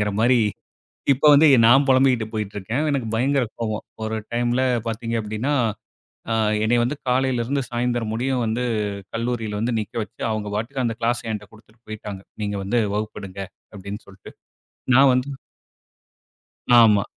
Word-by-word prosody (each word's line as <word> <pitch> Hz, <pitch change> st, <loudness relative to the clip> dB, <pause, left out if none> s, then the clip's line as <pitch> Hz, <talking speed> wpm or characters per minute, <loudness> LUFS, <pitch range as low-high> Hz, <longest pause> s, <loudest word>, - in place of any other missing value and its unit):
அப்டிங்கிற 105 Hz, 0 st, +1 dB
மாரி, 120 Hz, +1 st, +4 dB, 0.7 s
இப்ப 135 Hz, +3 st, -3 dB
வந்து 150 Hz, +3 st, +6 dB, 0.2 s
நான் 135 Hz, +4 st, +6 dB
பொலம்பிட்டு 130 Hz, -3 st, +4 dB
போய்கிட்டு 105 Hz, -2 st, -4 dB
இருக்கேன். 115 Hz, +10 st, -2 dB
எனக்கு 135 Hz, -5 st, -1 dB
பயங்கர 135 Hz, +2 st, +2 dB, 0.2 s
கோவம். 110 Hz, -2 st, -3 dB, 0.2 s
ஒரு 110 Hz, 0 st, -2 dB, 0.2 s
டைம்ல 120 Hz, +2 st, +1 dB, 0.3 s
பார்த்தீங்க 115 Hz, +1 st, -3 dB
அப்டினா, 110 Hz, +7 st, -2 dB, 0.8 s
ஆ -, -, +2 dB, 0.3 s
என்னைய 120 Hz, +2 st, +3 dB
வந்து 125 Hz, +5 st, -1 dB
காலையில 125 Hz, -1 st, +1 dB
இருந்து 140 Hz, +3 st, -1 dB
சாயந்திரம் 120 Hz, -2 st, -1 dB
முடியும் 125 Hz, +2 st, -1 dB
வந்து 115 Hz, +3 st, -1 dB, 0.5 s
கல்லூரியில 115 Hz, -3 st, -2 dB
வந்து 120 Hz, +1 st, 0 dB
நிக்க 105 Hz, -, -6 dB
வெச்சு, -, -, -15 dB
அவங்க 110 Hz, -1 st, -3 dB
பாட்டுக்கு 130 Hz, +5 st, -2 dB
அந்த 115 Hz, -, -1 dB
கிளாஸ்ஸ 115 Hz, 0 st, -1 dB
என்ட 105 Hz, -1 st, -6 dB
குடுத்துட்டு 110 Hz, +1 st, -21 dB
போய்ட்டாங்க. 105 Hz, -2 st, -7 dB, 0.2 s
நீங்க 100 Hz, 0 st, -2 dB
வந்து 115 Hz, +5 st, +1 dB, 0.2 s
வகுப்பெடுங்க 105 Hz, -2 st, -5 dB, 0.3 s
அப்படினு 100 Hz, +2 st, -7 dB
சொல்லிட்டு. 95 Hz, -1 st, -13 dB, 0.7 s
நான் 135 Hz, 0 st, +7 dB
வந்து 125 Hz, +2 st, 0 dB, 1.5 s
ஆமா. 105 Hz, -3 st, +5 dB
115 Hz, 145 wpm, -22 LUFS, 110-125 Hz, 1.5 s, நான்